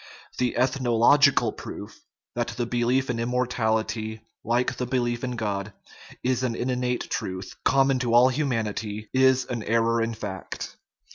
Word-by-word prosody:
The 125 -2 0
ethnological 130 +3 +4
proof - - -9 0.3
that 120 0 -1
the 120 - 0
belief 125 +2 +1
in 115 - -3
immortality, 110 -2 -1 0.2
like 120 +2 0
the 125 - -2
belief 120 -1 -1
in 125 -1 -2
God, 105 -2 -3 0.5
is 130 0 +1
an 125 -3 -1
innate 125 0 -1
truth, 95 0 -4
common 135 -1 +3
to 120 -2 +1
all 125 +2 +7
humanity 110 -6 -2
is 130 -1 +4
an 120 -2 -4
error 115 +1 +2
in 115 0 -1
fact. 95 -4 -6
120 Hz, 140 wpm, -25 LUFS, 110-125 Hz, 0.5 s, all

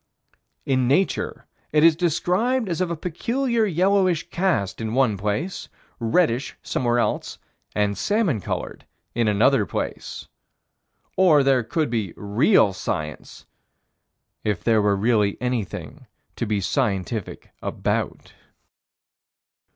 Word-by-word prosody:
In 130 -2 +1
Nature, 150 +9 0 0.3
it 150 0 +3
is 165 -1 +7
described 185 - +1
as 175 0 -2
of 180 - 0
a 170 - -2
peculiar 230 - -1
yellowish 185 -1 +2
cast 170 - 0
in 110 +1 -3
one 130 -6 +3
place, 105 - -3 0.3
reddish 120 +1 +1
somewhere 120 -1 0
else, 120 - -1 0.4
and 105 -1 +1
salmon 200 - 0
colored - - -5 0.3
in 115 -1 +1
another 105 +4 +4
place. 85 - -5 0.9
Or 160 -7 +5
there 135 -2 +3
could 150 +2 -1
be 110 -7 -2
real 105 - +3
science 80 -5 -5 1.0
if 105 -4 -1
there 110 -2 +3
were 100 -1 +2
really 105 -1 +1
anything 125 -5 -4 0.3
to - - -3
be 105 -1 0
scientific 105 -2 -2
about. - - -3
130 Hz, 115 wpm, -23 LUFS, 105-175 Hz, 1.0 s, is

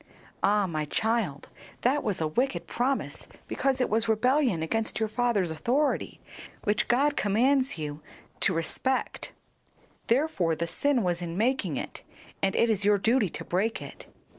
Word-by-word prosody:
"Ah, 205 0 +3
my 155 -4 -2
child, 215 -5 -1 0.3
that 275 +4 +2
was 205 -4 -1
a 160 - 0
wicked 250 - -1
promise 260 +3 -2 0.2
because 270 -1 0
it 255 - +2
was 225 +1 +1
rebellion 245 - +2
against 220 +8 -1
your 220 - +1
father's 215 -6 0
authority, 245 - 0 0.4
which 210 0 +1
God 280 +4 +3
commands 260 +5 +2
you 150 -1 -5 0.4
to - - +3
respect. 185 +10 -2 0.8
Therefore 230 - +1
the 170 - -2
sin 260 +7 +1
was 175 -1 0
in 170 0 -4
making 215 - +1
it, - - -5 0.4
and 195 0 +1
it 230 - +4
is 210 -3 +1
your 205 0 +4
duty 225 0 +2
to - - -7
break 205 +6 0
it." - - -10
220 Hz, 155 wpm, -28 LUFS, 175-255 Hz, 0.8 s, it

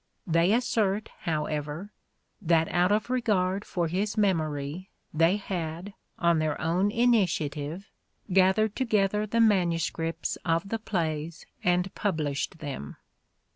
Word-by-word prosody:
They 170 +2 +3
assert, 220 -3 +1 0.2
however, 150 +4 -3 0.5
that 165 -3 +3
out 180 +2 +2
of 215 +4 +1
regard 200 -6 +1
for 175 -5 -2
his 200 +6 -2
memory 160 -3 -1 0.2
they 165 +5 +3
had, 180 -1 -5 0.2
on 170 -1 +3
their 155 -1 -1
own 175 +5 +1
initiative, 185 -7 0 0.4
gathered 195 +3 +4
together 210 -4 +1
the 230 +3 0
manuscripts 170 -6 +1
of 165 +3 0
the 225 - -2
plays 165 -6 -3 0.2
and 180 +1 +1
published 155 -4 -2
them. 140 - -6
180 Hz, 115 wpm, -28 LUFS, 160-205 Hz, 0.5 s, gathered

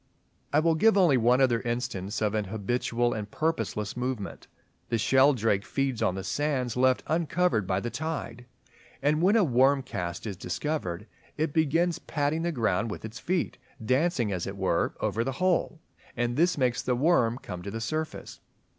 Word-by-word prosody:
I 150 - +4
will 165 +1 +3
give 215 +6 +4
only 175 -8 +5
one 125 +3 +3
other 120 -3 +3
instance 110 -4 -3
of 105 -1 +1
an 105 -1 0
habitual 120 +4 -1
and 105 -1 -5
purposeless 155 -9 -2
movement. 125 -4 -4 0.4
The 115 - +1
Sheldrake 125 -4 +3
(Tadorna) - - -17
feeds 135 -4 -1
on 90 - +1
the 95 - -4
sands 130 -1 -1
left 130 0 +3
uncovered 160 - +1
by 95 +1 +1
the 120 - -4
tide, 125 -4 -5 0.6
and 150 +2 +2
when 195 +5 +4
a 225 - +5
worm 135 -1 +3
cast 90 -7 -5
is 100 -3 -4
discovered, 100 - -3 0.3
"it 155 -1 -1
begins 165 +2 +2
patting 145 +2 -1
the 170 +1 0
ground 115 - 0
with 105 - -6
its 110 +2 -8
feet, 175 -7 -2 0.3
dancing 130 - +1
as 90 -3 -3
it 100 +1 -6
were, 95 -3 0
over 115 - 0
the 135 +2 -2
hole;" 180 0 0 0.4
and 120 0 0
this 170 +4 +2
makes 125 -3 +1
the 125 - 0
worm 125 -4 +2
come 90 -8 -7
to 100 - -6
the 115 - -5
surface. 155 +7 -4
125 Hz, 180 wpm, -28 LUFS, 110-155 Hz, 0.6 s, only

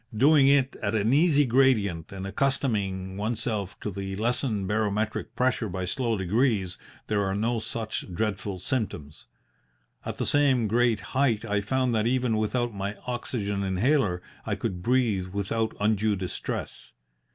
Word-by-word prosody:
Doing 140 +2 +6
it 135 -1 +3
at 100 +2 -2
an 110 +3 +2
easy 145 -1 +4
gradient 115 -10 +2
and 95 -1 -6
accustoming 100 -5 -1
oneself 105 -2 -2
to 105 - -3
the 95 0 -5
lessened 110 -2 0
barometric 105 +1 -1
pressure 125 -3 +1
by 95 0 -3
slow 115 +4 -1
degrees, 100 -1 +1 0.3
there 105 -1 0
are 95 0 -1
no 115 +3 0
such 110 -3 -4
dreadful 100 0 -2
symptoms. 90 - -4 0.8
At - - -5
the - - -1
same 135 -6 +3
great 115 -1 +2
height 125 -5 +2
I 105 -2 0
found 130 +3 0
that 110 0 +1
even 125 -2 +1
without 120 +2 0
my 100 +1 -3
oxygen 115 -5 -2
inhaler 95 -1 +1 0.2
I - - -2
could 90 -2 -4
breathe 115 -5 +1
without 100 +4 -2
undue 105 0 +2
distress. 95 -2 -5
110 Hz, 145 wpm, -27 LUFS, 100-125 Hz, 0.8 s, Doing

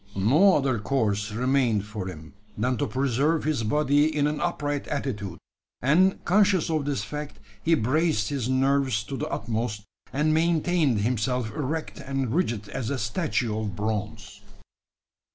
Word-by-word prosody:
No 150 - +5
other 135 -5 0
course 105 -3 0
remained 120 -3 +1
for 105 -3 -5
him, 80 -4 -9 0.2
than 125 +4 +1
to 145 - 0
preserve 140 +4 +1
his 155 -5 0
body 145 +5 +3
in 150 -2 0
an 150 0 -1
upright 145 -5 -2
attitude; 105 -10 -3 0.4
and, 175 +9 +3
conscious 190 -3 +3
of 155 -3 0
this 140 -7 -1
fact, 150 +5 -6 0.2
he 165 +6 +3
braced 145 -2 +1
his 130 -4 -2
nerves 130 -3 +2
to 135 - -6
the - - -3
utmost, 110 -2 -3 0.3
and 150 +3 +1
maintained 160 - +2
himself 120 +1 0
erect 150 +6 -4
and 135 -3 -2
rigid 120 - -1
as 115 - -3
a 140 - -1
statue 120 -1 -1
of 105 -3 -3
bronze. 105 -1 -4
130 Hz, 150 wpm, -26 LUFS, 110-150 Hz, 0.4 s, No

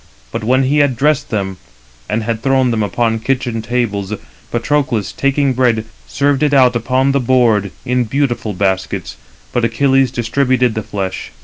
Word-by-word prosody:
But 115 - -4
when 130 +4 +3
he 140 +3 +2
had 140 -4 +2
dressed 150 +2 +1
them, 95 -4 -2 0.5
and 110 +1 -1
had 115 0 -2
thrown 130 -1 +2
them 115 -2 0
upon 115 +3 0
kitchen 120 -1 -1
tables, 110 -4 -2 0.4
Patroclus, 120 -3 0
taking 140 0 +1
bread, 120 -3 +1 0.2
served 140 0 +1
it 145 -1 +3
out 125 -2 +5
upon 130 +3 +1
the 140 - +2
board 120 -5 +2 0.2
in 125 0 +1
beautiful 120 -3 -1
baskets: 95 0 -2 0.4
but 120 - 0
Achilles 130 +3 +2
distributed 125 0 +1
the 110 - -2
flesh. 95 -2 -4
125 Hz, 155 wpm, -16 LUFS, 110-135 Hz, 0.5 s, out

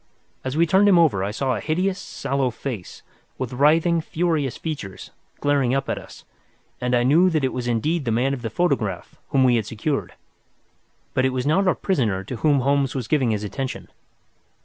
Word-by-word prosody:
As 130 +3 -3
we 170 - +5
turned 195 +3 +4
him 185 - +6
over 145 - +3
I 100 - -1
saw 130 +5 -1
a - - -3
hideous, 185 - -1
sallow 135 -2 -2
face, 115 -4 -7 0.3
with 130 -2 -4
writhing, 160 +5 +3
furious 155 -5 -1
features, 135 - -6 0.3
glaring 140 -3 +2
up 135 0 -2
at - - -1
us, - - -14 0.6
and 125 0 +1
I 120 - +3
knew 160 +9 +5
that 155 -4 0
it 130 - 0
was 125 -1 -3
indeed 140 +7 0
the 115 - 0
man 125 +5 +1
of 130 - -5
the 115 - -3
photograph 110 - -1 0.2
whom 135 - +3
we 125 -2 +4
had 110 -2 -2
secured. 135 +6 -3 1.0
But 130 - +2
it - - +3
was 130 0 -2
not 185 +6 +2
our 185 - +3
prisoner 115 - 0
to 120 +5 -6
whom 145 +2 +2
Holmes 140 0 +1
was 125 -5 -3
giving 130 -3 +2
his 105 -1 -1
attention. 130 +5 -5
135 Hz, 195 wpm, -23 LUFS, 120-155 Hz, 1.0 s, him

